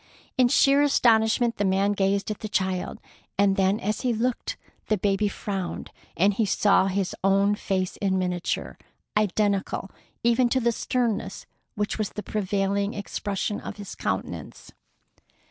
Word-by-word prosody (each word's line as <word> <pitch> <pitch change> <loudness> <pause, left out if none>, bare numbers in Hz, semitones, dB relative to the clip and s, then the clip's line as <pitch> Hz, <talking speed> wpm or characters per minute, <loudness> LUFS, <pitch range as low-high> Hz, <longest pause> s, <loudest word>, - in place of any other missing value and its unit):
In 255 -2 +5
sheer 275 +3 +5
astonishment 235 -4 +3
the 205 - 0
man 195 +1 +2
gazed 200 +1 0
at 210 - -5
the 215 - -5
child, 190 -2 -1 0.4
and 200 -1 +4
then 195 +2 +2
as 215 0 -2
he 250 -2 +1
looked 240 +2 -2 0.3
the 215 - +2
baby 200 +2 +1
frowned, 195 -3 -4 0.3
and 195 +4 +4
he 220 - +1
saw 200 -1 +3
his 195 -1 -1
own 195 +1 +4
face 190 -3 -2
in 190 -2 0
miniature, 180 -1 -2 0.4
identical 205 -2 0 0.3
even 235 +1 +3
to 260 - +2
the 235 -1 +2
sternness 225 -5 -2 0.3
which 210 +1 -2
was 215 - 0
the 210 - -5
prevailing 200 0 -1
expression 205 0 -3
of - - -7
his 205 -1 -7
countenance. - - -4
205 Hz, 145 wpm, -25 LUFS, 195-220 Hz, 0.4 s, In